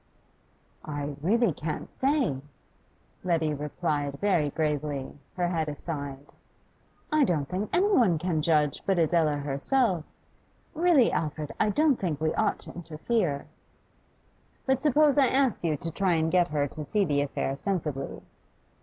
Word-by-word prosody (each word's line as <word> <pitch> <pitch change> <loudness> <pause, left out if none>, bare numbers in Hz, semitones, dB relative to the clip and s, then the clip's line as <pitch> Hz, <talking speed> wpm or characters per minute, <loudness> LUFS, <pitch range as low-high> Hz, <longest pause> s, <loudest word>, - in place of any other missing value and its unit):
'I 145 -1 -4
really 215 +3 +2
can't 155 +2 -5
say,' 265 - 0 0.8
Letty 165 -4 +1
replied 145 -1 -2
very 180 -8 +2
gravely, 145 -2 -2 0.2
her 180 -1 0
head 160 -3 -1
aside. 145 -2 -5 0.9
'I 305 -1 +4
don't 155 - 0
think 190 +5 -3
any 400 +4 +3
one 190 -10 +4
can 165 -1 -1
judge 150 -3 +2
but 195 -2 +2
Adela 160 -2 +2
herself. 160 - 0 0.7
Really, 320 -6 +4
Alfred, 155 -1 -2
I 215 - +3
don't 295 +4 +3
think 165 -7 -2
we 155 0 0
ought 215 - +1
to - - -10
interfere.' 165 -1 -2 1.2
'But 265 -1 +1
suppose 295 0 +4
I 270 - +6
ask 265 -6 +1
you 155 -3 +1
to 165 +3 -5
try 185 +1 +1
and 160 0 +1
get 180 -1 +4
her 145 -3 0
to 155 - -7
see 200 +7 +1
the 145 -4 +1
affair 135 -1 -2
sensibly? 150 -4 -3
165 Hz, 145 wpm, -27 LUFS, 150-210 Hz, 1.2 s, I